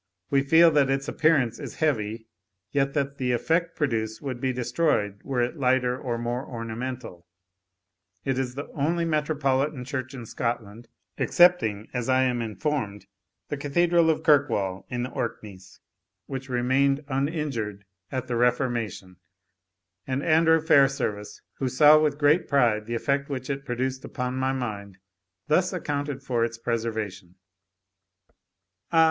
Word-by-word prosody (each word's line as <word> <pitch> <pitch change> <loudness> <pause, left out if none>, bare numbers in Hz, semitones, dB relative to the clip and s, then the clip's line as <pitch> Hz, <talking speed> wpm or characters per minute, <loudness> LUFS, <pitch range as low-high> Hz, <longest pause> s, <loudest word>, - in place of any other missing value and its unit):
We 140 -1 +4
feel 160 +4 +6
that 145 -3 +3
its 135 0 -1
appearance 140 -8 +2
is - - -7
heavy, 115 -7 -1 0.5
yet 140 0 0
that 140 -1 -1
the 125 -1 0
effect 165 +7 0
produced 110 -7 -1
would 130 -4 -5
be 130 - +1
destroyed 120 -5 0
were 130 -3 0
it 125 +7 -3
lighter 125 -1 +2
or 125 -2 -3
more 120 +2 -3
ornamental. 115 -6 -6 1.0
It 130 -1 0
is 125 -1 -3
the 145 +2 -4
only 165 +4 0
metropolitan 150 -3 0
church 130 0 -4
in 120 -3 -7
Scotland, 115 -1 -4 0.3
excepting, 115 - +3
as 125 -1 -2
I 130 0 +4
am 125 -2 0
informed, 110 -3 -3 0.4
the 145 - -3
Cathedral 170 +4 +2
of 160 - +1
Kirkwall, 115 -11 +2
in 120 -1 -2
the 125 - -5
Orkneys, 95 -3 -6 0.5
which 135 -1 -6
remained 135 +3 +1
uninjured 135 - -2 0.3
at 130 -1 -3
the 125 -2 -3
Reformation; 120 -6 -1 0.9
and 135 +1 -2
Andrew 160 0 +4
Fairservice, 135 -9 +2 0.2
who 130 - 0
saw 150 +4 +7
with 150 -2 +1
great 150 +4 +3
pride 115 -6 +2
the 120 - -2
effect 140 +4 -1
which 130 -1 -4
it 140 0 -5
produced 130 +2 -2
upon 125 0 -4
my 130 0 0
mind, 105 -7 -5 0.5
thus 180 +4 +2
accounted 145 -6 -3
for 120 -4 0
its 115 0 -2
preservation 110 -6 -3 1.6
"Ah! 165 - +4
130 Hz, 140 wpm, -26 LUFS, 115-145 Hz, 1.6 s, saw